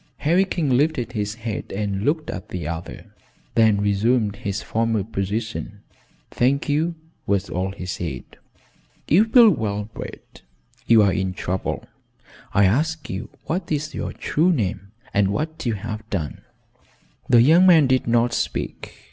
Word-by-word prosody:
Harry 175 +6 +3
King 155 -8 0
lifted 130 -3 +1
his 105 -2 -3
head 115 -2 -5
and 100 -1 -2
looked 150 +7 0
at 90 - -7
the 85 -5 -4
other, 85 0 -7 0.4
then 110 -3 +4
resumed 105 +1 +1
his 100 0 -4
former 115 -2 0
position. 105 +1 -4 0.5
"Thank 135 +3 +1
you," 160 +4 0 0.3
was 100 0 0
all 95 +2 -1
he 95 -2 -8
said. 85 -8 -4 0.8
"You've 215 +8 +4
been 230 -7 +7
well 105 -2 -2
bred. - - -10 0.5
You're 105 -4 +5
in 95 -2 -2
trouble. 95 0 -3 0.7
I 100 - +4
ask 155 +10 0
you 95 - -5 0.2
what 170 +1 -3
is 155 0 -2
your - - -4
true 170 +5 +1
name 100 - -2 0.2
and 100 -1 +3
what 155 +8 -3
you 115 - +1
have 110 +2 -6
done?" 80 -8 -3 0.9
The 120 -2 +7
young 170 +7 +6
man 165 -5 +7
did 130 -2 +1
not 120 0 +2
speak. - - -3
110 Hz, 145 wpm, -22 LUFS, 100-150 Hz, 0.9 s, been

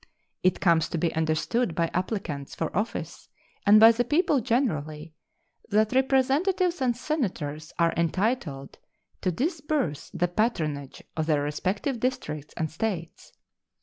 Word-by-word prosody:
It 185 - +2
comes 165 -4 +3
to - - -2
be 165 0 0
understood 160 +6 0
by 165 0 0
applicants 180 -7 -3
for 165 - -3
office 210 +5 -3 0.4
and 210 +1 +8
by 225 +1 +9
the 235 +1 +1
people 295 +3 +2
generally 160 - -1 0.6
that 215 +1 +3
Representatives 280 +7 +2
and 245 -2 +1
Senators 175 - -3
are 170 -1 +3
entitled 170 - -1 0.4
to 185 - +1
disburse 290 - -2
the 175 -1 0
patronage 155 - -2
of 160 -1 -1
their 150 -3 +2
respective 190 - -2
districts 155 - -3
and 160 -3 -2
States. 170 -2 -4
185 Hz, 130 wpm, -27 LUFS, 155-250 Hz, 0.6 s, by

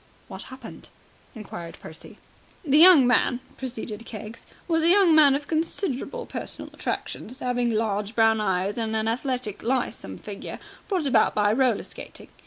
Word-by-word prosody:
"What - - -8
happened?" 260 0 -11 0.5
inquired 175 -6 -8
Percy. 160 - -10 0.5
"The 290 +1 +4
young 335 -6 +9
man," 245 0 +2 0.2
proceeded 230 -4 -6
Keggs, 220 0 -9 0.2
"was 325 -2 +2
a 330 - +4
young 370 -3 +6
man 295 -3 +6
of 285 0 -4
considerable 330 - -2
personal - - -7
attractions, 255 +4 -5
'aving 245 -2 0
large 215 -1 -1
brown 225 -1 +4
eyes 195 +2 0
and 220 -1 -2
a 220 0 0
athletic 245 -2 -2
lissome 240 - -2
figure, 205 -2 -8 0.3
brought 370 -7 -1
about 275 - +3
by 210 0 +3
roller 250 -3 +2
skating. - - -10
245 Hz, 150 wpm, -25 LUFS, 215-285 Hz, 0.5 s, young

